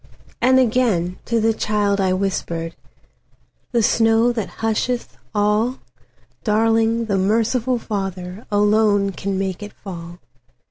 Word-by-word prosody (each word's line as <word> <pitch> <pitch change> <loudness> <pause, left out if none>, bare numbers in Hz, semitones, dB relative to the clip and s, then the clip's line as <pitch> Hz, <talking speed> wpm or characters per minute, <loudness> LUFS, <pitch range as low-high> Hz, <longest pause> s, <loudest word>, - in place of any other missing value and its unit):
And 260 +1 +5
again 220 -8 +1
to 230 -1 +1
the 225 +1 +2
child 205 -2 0
I 190 -1 +2
whispered,"The 185 +5 -5
snow 225 +2 +3
that 225 -4 -3 0.2
husheth 235 +2 -1 0.2
all, 210 +5 +1 0.7
Darling, 225 +1 +2
the 200 -3 0
merciful 230 +5 +1
FatherAlone 205 0 0
can 195 0 -2
make 190 -1 -2
it 205 0 -8
fall!" 170 -3 -9
210 Hz, 105 wpm, -21 LUFS, 195-225 Hz, 0.7 s, And